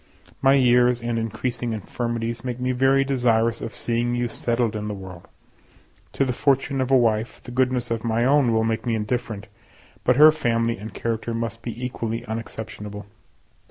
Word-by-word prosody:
My 135 0 +5
years 125 -2 +4
and 120 -1 -2
increasing 115 +2 -2
infirmities 115 +2 -3
make 125 -1 -4
me 125 0 0
very 135 +2 +3
desirous 115 -4 +1
of 115 - -4
seeing 120 +1 -1
you 120 0 0
settled 115 -1 -1
in 105 0 -3
the 105 - -3
world. 95 -3 -10 0.9
To 135 - +1
the 125 - -1
fortune 135 +1 +1
of 130 - -1
a 135 - +6
wife, 115 -2 +1
the - - -9
goodness 125 -1 0
of 115 -1 -1
my 115 0 +1
own 140 -2 +4
will 110 0 +2
make 115 0 -1
me 115 -2 0
indifferent, 110 -1 -3 0.6
but 125 - +3
her 155 +3 +9
family 115 -6 0
and 105 +2 -7
character 115 +2 -3
must 115 0 -4
be 120 +1 -5
equally 115 -2 -3
unexceptionable. 105 -2 -6
120 Hz, 175 wpm, -23 LUFS, 115-125 Hz, 0.9 s, her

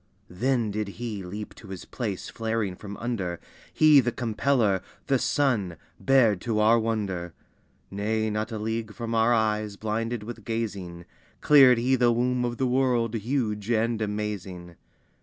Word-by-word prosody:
Then 120 +3 0
did 105 0 -2
He 115 -4 -4
leap 105 +4 -7
to 110 - -14
His 95 -2 -8
place 105 -7 -4
flaring 110 -4 -2
from 100 +1 -9
under, 100 -8 -3 0.3
He 155 -2 +6
the 120 -2 +1
Compeller, 115 -4 +1 0.2
the 135 -2 +2
Sun, 110 - 0 0.2
bared 115 -8 +3
to 110 -3 -1
our 110 +2 +5
wonder. 100 -7 -3 0.6
Nay, 110 +2 -1
not 110 +2 -2
a 110 - -3
league 110 0 -3
from 115 -1 -4
our 115 +1 +3
eyes 110 -2 +1
blinded 110 +2 -3
with 110 0 -8
gazing, 100 -7 -4 0.3
Cleared 135 -4 +7
He 125 +3 +2
the 120 -1 +3
womb 125 +1 +1
of 120 0 -3
the 130 - 0
world, 125 -3 +1
huge 110 -2 -2
and 115 0 +1
amazing! 100 -5 -4
110 Hz, 155 wpm, -26 LUFS, 105-120 Hz, 0.6 s, Cleared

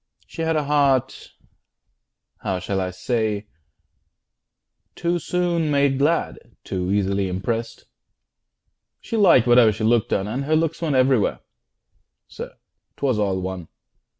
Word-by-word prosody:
She - - -8
had 160 0 0
A 155 - +1
heart 140 -3 +1 1.1
how 95 - -2
shall 95 +1 -2
I 95 - -2
say 105 +2 -2 1.5
too 175 0 -1
soon 170 -1 -1
made 140 -2 +2
glad, 160 +4 +1 0.2
Too 90 -1 -3
easily 100 -1 0
impressed; 115 +5 -4 1.1
she - - -6
liked 180 - +5
whate'er 120 -2 +6
She 110 +1 -5
looked 115 0 +2
on, 95 +1 0
and 130 +6 -3
her 155 +2 +2
looks 165 +1 0
went 155 -5 0
everywhere. 130 -4 +2 0.9
Sir, - - -9 0.4
'twas 130 -6 0
all 95 -3 0
one! 95 -3 -5
125 Hz, 125 wpm, -22 LUFS, 100-150 Hz, 1.5 s, whate'er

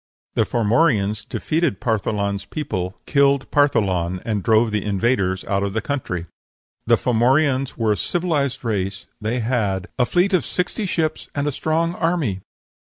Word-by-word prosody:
The - - +2
Formorians 110 -3 +2
defeated 155 - 0
Partholan's 105 -4 -1
people, 95 - -4
killed 140 -1 +2
Partholan, 95 -11 +2
and 105 -3 -1
drove 110 +2 +3
the 105 -2 -1
invaders 100 -2 0
out 100 0 0
of 100 -1 -2
the 110 - 0
country. 95 -12 -3 0.6
The 120 - +6
Formorians 130 +3 +2
were 115 -2 +1
a 105 - +1
civilized 145 -7 -1
race; 100 -3 -2 0.2
they 115 +3 -1
had 105 -5 0
"a 125 - +3
fleet 185 +3 +2
of 180 -6 +3
sixty 185 +3 -2
ships 160 -3 -1
and 145 0 0
a 145 - +1
strong 160 +4 0
army." 165 - 0
120 Hz, 150 wpm, -21 LUFS, 100-145 Hz, 0.6 s, The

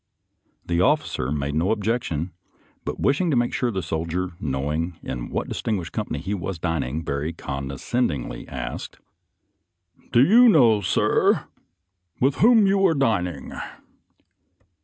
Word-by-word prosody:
The 85 0 +1
officer 145 - +1
made 70 -1 -2
no 80 +5 +1
ob 110 -2 0
jection, 95 -7 -1 0.5
but - - -4
wishing 145 +6 +2
to 140 - +2
make 120 0 +1
sure 125 - 0
of 110 - -5
the 95 - -1
soldier 85 +3 -2
knowing 75 +4 -2
in 60 -2 -5
what - - -2
distinguished 100 -7 -3
company - - -3
he 95 +4 -3
was 95 -1 -4
dining, 80 -2 -2
very 70 +4 -2
condescendingly 70 - -3
asked, 65 -2 -6 0.6
" - - -35
Do 120 - +6
you 240 +7 +7
know, 120 - +5
sir, 90 - +2 0.7
with 135 +2 +2
whom 225 -2 +6
you 195 0 +3
are 165 - +1
din 110 -10 +2
ing." 90 - -8
90 Hz, 145 wpm, -24 LUFS, 75-125 Hz, 0.7 s, you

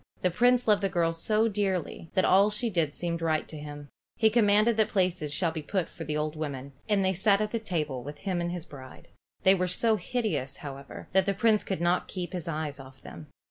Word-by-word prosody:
The 180 - +3
Prince 245 +5 +3
loved 210 -1 +4
the 195 - +1
girl 170 -2 +1
so 215 +7 +1
dearly 195 -6 -2
that 185 - +3
all 195 +3 +5
she 215 +2 -1
did 165 -5 +1
seemed 170 +1 -3
right 160 -1 0
to - - -9
him. 145 -1 -8 0.3
He 220 -1 +4
commanded 215 0 +4
that 220 - +3
places 180 -6 0
should 165 +2 0
be 160 - -4
put 180 +4 -2
for 165 - -7
the 150 0 -2
old 150 +1 -2
women, 140 -3 -5 0.2
and 200 -2 +3
they 190 - +2
sat 200 +2 +3
at 215 0 -1
the 230 - -1
table 150 - -2
with 145 +4 -8
him 180 +1 -2
and 170 0 -2
his 175 -2 -5
bride. 130 -2 -12 0.3
They 190 -1 +7
were 185 -1 0
so 220 +5 +2
hideous, 205 - -2
however, 140 -1 -8
that 190 +1 +3
the 200 - +1
Prince 220 0 +3
could 190 -3 -3
not 175 +1 +1
keep 180 0 -5
his 175 -3 -4
eyes 150 -3 -3
off 130 0 -13
them. 85 -2 -10
180 Hz, 230 wpm, -28 LUFS, 155-205 Hz, 0.3 s, They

